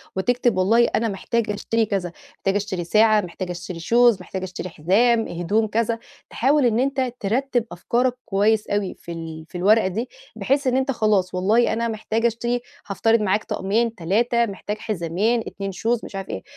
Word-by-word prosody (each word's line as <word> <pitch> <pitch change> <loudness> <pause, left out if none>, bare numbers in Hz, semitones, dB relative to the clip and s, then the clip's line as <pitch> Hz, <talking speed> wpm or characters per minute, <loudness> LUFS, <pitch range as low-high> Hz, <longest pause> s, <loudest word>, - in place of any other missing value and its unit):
وتكتب 240 +2 +1
والله 225 +6 +4
أنا 230 - 0
محتاج 220 +2 -2
أشتري 225 +2 0
كذا، 190 -4 -2 0.2
محتاج 195 +1 -1
أشتري 200 -3 -2
ساعة 215 +4 +4
محتاج 180 0 -6
أشتري 175 0 -6
shoes 235 +2 +4
محتاج 190 +1 -6
أشتري 185 0 -6
حزام 220 +9 +2
هدوم 200 +6 0
كذا، 230 +1 0 0.3
تحاول 275 +3 +2
إن 235 -1 +2
أنت 265 -2 0
ترتب 245 +3 0
أفكارك 240 +8 0
كويس 210 +2 +2
أوي 205 -2 -1
في 170 - -11
ال 160 -1 -7
في 180 - -7
الورقة 205 +3 +4
دي 220 +7 -3 0.3
بحيث 275 0 0
إن 255 - +2
أنت 265 +1 +1
خلاص 210 -6 +1
والله 220 +6 +3
أنا 230 +1 -1
محتاج 220 +1 -2
أشتري 240 +1 0 0.3
هافترض 225 +3 +2
معاك 210 +1 +1
طقمين 225 +4 -1
3 235 +7 +1
محتاجة 205 0 -5
حزامين 210 +3 -1
2 195 0 -5
شوز 225 +6 -1
مش - - -10
عارف 195 -1 -5
إيه، 95 - -5
215 Hz, 175 wpm, -22 LUFS, 190-235 Hz, 0.3 s, والله